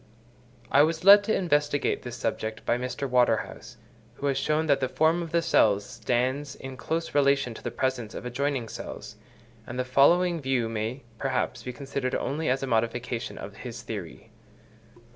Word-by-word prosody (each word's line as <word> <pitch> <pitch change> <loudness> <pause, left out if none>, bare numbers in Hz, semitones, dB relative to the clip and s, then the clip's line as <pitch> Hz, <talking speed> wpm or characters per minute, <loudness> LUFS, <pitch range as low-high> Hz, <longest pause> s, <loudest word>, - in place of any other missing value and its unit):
I 140 - +6
was 160 +2 +1
led 200 +1 +9
to 220 - +1
investigate 145 -5 +1
this 120 -1 -7
subject 110 0 -3
by - - +2
Mr. 125 +3 -3
Waterhouse, 120 -1 0 0.4
who 140 - -6
has 135 -2 +1
shown 155 +3 +1
that 140 -3 +3
the 130 -2 -1
form 160 +5 +2
of 165 -2 -6
the 170 0 +2
cell 105 -10 +4
stands 130 +6 -2
in 135 0 -8
close 165 +5 -3
relation 140 -3 +3
to - - -11
the - - -3
presence 130 -5 -2
of - - -7
adjoining 130 0 -1
cells; - - -8 0.5
and 120 - -6
the 125 - -1
following 170 +6 +4
view 130 -4 0
may, 115 +4 -3 0.2
perhaps, 135 -2 -1
be 125 - -5
considered 135 0 -3
only 150 +4 -1
as 135 +1 0
a - - -2
modification 115 +1 -1
of - - -8
his - - -8
theory. - - -7
135 Hz, 175 wpm, -27 LUFS, 125-145 Hz, 0.5 s, led